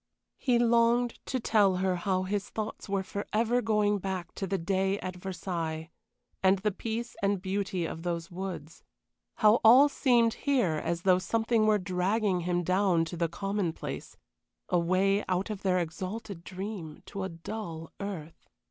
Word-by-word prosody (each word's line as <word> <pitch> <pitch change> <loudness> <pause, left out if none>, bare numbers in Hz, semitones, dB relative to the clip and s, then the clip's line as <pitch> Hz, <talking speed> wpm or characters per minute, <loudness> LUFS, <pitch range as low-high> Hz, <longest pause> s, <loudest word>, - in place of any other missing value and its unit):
He 250 -3 +2
longed 235 0 +3
to 260 - -1
tell 205 -5 +3
her 185 0 +1
how 185 +1 0
his 200 +1 -2
thoughts 215 -1 -5
were 195 -1 0
forever 220 +5 0
going 210 -2 +2
back 185 -2 -4
to 195 - -4
the 195 +1 0
day 190 +3 0
at 185 0 -5
Versailles, 165 -3 -4 0.5
and 190 +1 +5
the 210 +3 0
peace 230 +4 -4
and 200 -1 +1
beauty 190 -2 -2
of 160 - -5
those 170 -1 -3
woods 175 -4 -6 0.5
how 215 +1 +5
all 250 +6 +8
seemed 240 -5 +3 0.2
here 220 - +3
as 170 0 -2
though 185 -1 +5
something 225 +3 +1
were 215 -1 +5
dragging 190 +1 0
him 175 0 0
down 185 -2 +2
to 170 - -6
the 170 -1 0
commonplace, 195 -1 -3 0.5
away 185 +4 +2
out 185 +4 0
of 205 -2 -5
their 185 -2 +2
exalted 185 +3 -4
dream, 185 -4 -6
to 200 - -6
a 190 - -2
dull 165 -1 -7
earth. 180 -6 -7
190 Hz, 155 wpm, -29 LUFS, 175-215 Hz, 0.5 s, all